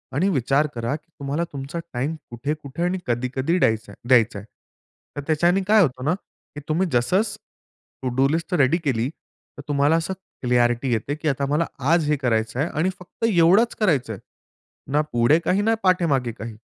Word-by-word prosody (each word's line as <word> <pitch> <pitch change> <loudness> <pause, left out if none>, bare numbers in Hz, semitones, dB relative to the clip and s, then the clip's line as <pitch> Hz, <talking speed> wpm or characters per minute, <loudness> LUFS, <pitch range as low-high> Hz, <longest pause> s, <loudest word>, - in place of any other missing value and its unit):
आणि 185 +7 +2
विचार 140 0 +2
करा 115 +5 -2
की 155 +2 -12
तुम्हाला 140 +4 -2
तुमचा 140 +5 -5
टाईम 140 +6 -2
कुठे-कुठे 145 +5 -4
आणि 180 +1 0
कधी-कधी 130 +7 0
डयाचाय 110 - 0
द्यायचाय. 115 -5 +3 0.7
तर - - -2
त्याच्याने 175 +5 +3
काय 215 0 +6
होतं 130 -5 0
ना 160 - +2 0.4
की - - -5
तुम्ही 175 +4 +1
जसंच 190 - +1 0.6
टू 130 - -1
डू 135 +1 +4
लिस्ट 165 +2 -2
रेडी 140 +6 +3
केली 125 -2 0
तर 150 -2 -17
तुम्हाला 145 +2 +3
असं 165 +3 -1 0.3
क्लिअरिटी 120 +1 +2
येते 135 +6 -1
की 155 0 -5
आता 140 0 -1
मला 155 +3 +2 0.3
आज 160 -3 +2
हे 150 - +2
करायचं 115 -2 -1
आहे 155 - +1
आणि 165 +5 0
फक्त 180 +5 -5
एवढंच 195 +4 +4
करायचंय, 135 - +1 0.7
ना 150 +1 +3
पुढे 120 +7 +4
काही, 185 +3 +1
ना 225 +2 +2
पाठेमागे 160 -10 +2
काही. 110 0 -8
145 Hz, 170 wpm, -23 LUFS, 125-170 Hz, 0.7 s, काय